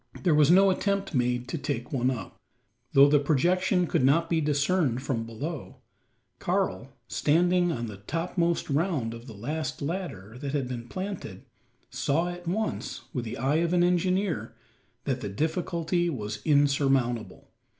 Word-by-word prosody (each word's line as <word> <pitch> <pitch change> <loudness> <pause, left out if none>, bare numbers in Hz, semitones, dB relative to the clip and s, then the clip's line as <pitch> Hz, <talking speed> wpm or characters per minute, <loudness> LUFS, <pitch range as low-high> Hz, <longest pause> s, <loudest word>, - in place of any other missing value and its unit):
There 175 -4 +4
was 150 -1 +5
no 190 +2 +6
attempt 200 0 -1
made 125 -1 0
to 160 - -3
take 140 -4 -4
one 125 -1 +2
up. 115 -8 -5 0.6
Though 140 +1 +8
the 145 0 +5
projection 175 +6 +2
could 145 - +1
not 165 +6 +3
be 165 -1 +2
discerned 145 -3 +1
from 115 -5 -2
below, 140 +6 -6 0.6
Karl, - - -1 0.2
standing 175 +3 +2
on 120 -6 -3
the 105 -3 -7
topmost 170 - -1
round 140 -7 0
of 115 +2 -10
the 115 - -9
last 150 +9 -3
ladder 140 - -5
that 140 0 -4
had 140 -4 0
been 120 -1 -6
planted, 185 -5 -6 0.5
saw 140 +6 0
at 175 0 -8
once, 215 +5 -2
with 125 -5 -2
the 110 - -5
eye 135 +5 +1
of 170 +1 +1
an 175 -1 +4
engineer, 180 +1 0 0.5
that - - -2
the - - -3
difficulty 170 - -1
was 105 -7 -4
insurmountable. 135 -5 +1
150 Hz, 155 wpm, -27 LUFS, 125-175 Hz, 0.6 s, Though